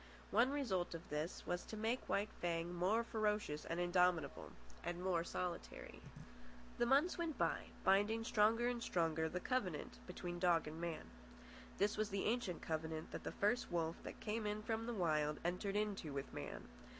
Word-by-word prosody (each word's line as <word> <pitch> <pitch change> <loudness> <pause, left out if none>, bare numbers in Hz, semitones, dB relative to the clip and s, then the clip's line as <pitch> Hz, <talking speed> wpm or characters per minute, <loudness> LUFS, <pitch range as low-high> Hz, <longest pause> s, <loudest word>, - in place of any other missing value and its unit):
One 245 +3 +5
result 210 -13 0
of 165 - -8
this 150 +3 -3
was 175 - -1
to 220 - -6
make 225 +4 -1
White 205 +2 +1
Fang 170 0 0
more 190 +7 +2
ferocious 210 -9 0
and 165 +1 -2
indomitable, 175 -1 +2 0.3
and 175 0 -2
more 180 -3 +2
solitary. 175 0 -4 0.8
The 240 - +4
months 290 +8 +4
went 330 -3 -1
by, - - +1 0.2
binding 205 +4 +4
stronger 225 +1 +4
and 245 -1 -1
stronger 160 -6 +1
the 180 - -2
covenant 185 - -1
between 175 -1 -4
dog 175 -3 +4
and 160 +2 -6
man. 170 -2 -4 0.7
This 210 +2 +2
was 215 0 +1
the 195 -1 -1
ancient 220 -6 0
covenant 160 0 -2
that - - -5
the - - -3
first 215 +5 +1
wolf 165 -1 0
that - - -7
came 215 0 -1
in 210 +1 -2
from 225 +1 -1
the 240 - -2
Wild 155 -5 +2
entered 190 +3 0
into 205 -7 0
with 140 -1 -4
man. - - -5
190 Hz, 175 wpm, -40 LUFS, 170-220 Hz, 0.8 s, One